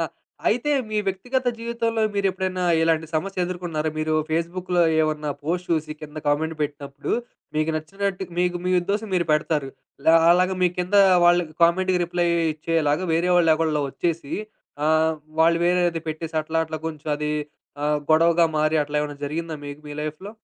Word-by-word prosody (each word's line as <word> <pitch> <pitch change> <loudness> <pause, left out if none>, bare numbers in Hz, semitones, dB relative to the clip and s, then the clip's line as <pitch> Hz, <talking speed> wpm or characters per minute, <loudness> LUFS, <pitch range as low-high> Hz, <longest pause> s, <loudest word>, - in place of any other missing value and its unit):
ఆ! - - +2 0.5
అయితే, 245 +7 +1 0.2
మీ 215 - -2
వ్యక్తిగత 245 +7 -1
జీవితంలో 230 -1 -1
మీరెప్పుడైనా 190 -2 -1 0.2
ఇలాంటి 165 -1 +2
సమస్యెదుర్కున్నారా? 175 -3 -2
మీరు 155 0 0 0.2
ఫేస్‌బుక్‌లో 175 +2 0 0.2
ఏమన్నా 150 -1 -1
పోస్ట్ 175 +4 -2
చూసి 155 -2 0
కింద 155 0 -8
కామెంట్ 160 +2 0
పెట్టినప్పుడు, 145 -1 -4 0.4
మీకు 155 +1 +1
నచ్చినట్టు, 190 +4 -3
మీకు 180 0 +1
మీ 185 - +1
ఉద్దేశం 205 +4 -2
మీరు 175 -2 +1
పెడతారు. 150 -2 0 0.4
ల - - +5 0.2
అలాగ 180 +1 +3
మీ 180 - +5
కింద 180 +3 -2 0.3
వాళ్ళకి 175 -3 +3
కామెంట్‌కి 185 +2 +2
రిప్లై 175 0 0 0.3
ఇచ్చేలాగా 155 +1 0
వేరే 175 +2 +2
వాళ్ళేవళ్లో 160 -3 +3
ఒచ్చేసి, 165 -3 -2 0.5
ఆహ్, 160 0 +3 0.3
వాళ్ళు 165 +1 +5
వేరేది 175 -2 +1
పెట్టేసి, 160 +1 -5
అట్లా, 160 +1 -2
అట్లా 155 0 -5
కొంచెం 155 -1 -5
అది 150 0 -2 0.5
ఆహ్, 150 0 +2
గొడవగా 165 +1 +5
మారి, 155 +1 +2
అట్లా 150 0 -4
ఏమన్నా 145 -1 -4
జరిగిందా 160 +2 -3
మీకు 145 +1 -8
మీ 145 - -7
లైఫ్‌లో? 155 +7 -6
165 Hz, 150 wpm, -23 LUFS, 155-180 Hz, 0.5 s, ల